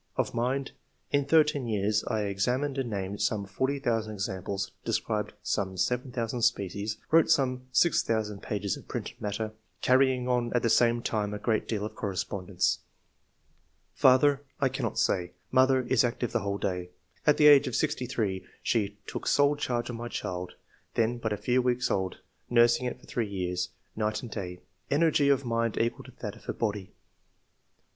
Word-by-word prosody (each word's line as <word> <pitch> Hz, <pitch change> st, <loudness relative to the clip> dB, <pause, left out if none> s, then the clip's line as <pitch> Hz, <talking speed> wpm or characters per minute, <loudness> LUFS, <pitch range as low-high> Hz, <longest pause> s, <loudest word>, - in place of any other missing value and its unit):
Of -, -, 0 dB
mind 130 Hz, +3 st, -1 dB, 0.2 s
— -, -, -42 dB
In 140 Hz, -1 st, +2 dB
thirteen 150 Hz, -3 st, +3 dB
years 105 Hz, 0 st, +1 dB
I 110 Hz, -, 0 dB
examined 125 Hz, +8 st, 0 dB
and 130 Hz, -3 st, -2 dB
named 100 Hz, -1 st, -3 dB
some 105 Hz, -2 st, 0 dB
40,000 115 Hz, +1 st, -1 dB
examples, 95 Hz, -1 st, -3 dB
de -, -, -2 dB
scribed -, -, -1 dB
about -, -, -33 dB, 0.4 s
7,000 125 Hz, +2 st, -1 dB
species, 100 Hz, +1 st, 0 dB
wrote 165 Hz, 0 st, +5 dB
some 130 Hz, -2 st, +2 dB
6,000 110 Hz, -, +2 dB
pages 100 Hz, -2 st, -2 dB
of -, -, -13 dB
printed -, -, -6 dB
matter, 105 Hz, +1 st, -2 dB, 0.3 s
carrying 130 Hz, -1 st, +3 dB
on 120 Hz, -2 st, +1 dB
at 120 Hz, -, +1 dB
the 115 Hz, -, +3 dB
same 120 Hz, 0 st, +3 dB
time 105 Hz, -1 st, -1 dB
a -, -, -3 dB
great 110 Hz, 0 st, 0 dB
deal 105 Hz, -2 st, -2 dB
of 110 Hz, -, -6 dB
correspondence. 95 Hz, -2 st, -1 dB, 1.2 s
^'Father 135 Hz, +2 st, +5 dB
— -, -, -40 dB
I 135 Hz, -, +3 dB
cannot 135 Hz, -, -3 dB
say. 90 Hz, -1 st, +1 dB, 0.2 s
Mother 130 Hz, 0 st, +4 dB
— 125 Hz, -, -9 dB
Is 130 Hz, -1 st, +4 dB
active 120 Hz, 0 st, -1 dB
the 120 Hz, -, +1 dB
whole 100 Hz, 0 st, -2 dB
day. 90 Hz, -3 st, -2 dB, 0.4 s
At 150 Hz, -, +6 dB
the 150 Hz, -, +5 dB
age 145 Hz, -1 st, +8 dB
of 130 Hz, -, -2 dB
sixty 145 Hz, -5 st, 0 dB
three 100 Hz, -6 st, -1 dB, 0.2 s
she 105 Hz, -3 st, 0 dB
took -, -, -5 dB
sole 145 Hz, +1 st, +4 dB
charge 125 Hz, -4 st, -2 dB
of 115 Hz, -, -6 dB
my 120 Hz, +1 st, -5 dB
child, 90 Hz, -5 st, -4 dB, 0.4 s
then 120 Hz, +1 st, +1 dB
but 110 Hz, -2 st, -2 dB
a 105 Hz, -, 0 dB
few 125 Hz, +5 st, +2 dB
weeks 125 Hz, 0 st, +1 dB
old, 95 Hz, -1 st, -1 dB, 0.3 s
nursing 120 Hz, +1 st, +4 dB
it 125 Hz, -, -5 dB
for -, -, -18 dB
three 120 Hz, -7 st, -2 dB
years, 90 Hz, -2 st, -2 dB, 0.3 s
night 105 Hz, +1 st, -1 dB
and 120 Hz, -, -7 dB
day. 90 Hz, -4 st, -5 dB, 0.3 s
Energy 145 Hz, -1 st, +3 dB
of 135 Hz, -1 st, +3 dB
mind 115 Hz, -1 st, 0 dB
equal 115 Hz, +1 st, 0 dB
to -, -, -12 dB
that -, -, -4 dB
of -, -, -17 dB
her -, -, -2 dB
body." 105 Hz, -4 st, -2 dB
4. -, -, -27 dB
115 Hz, 180 wpm, -29 LUFS, 100-130 Hz, 1.2 s, age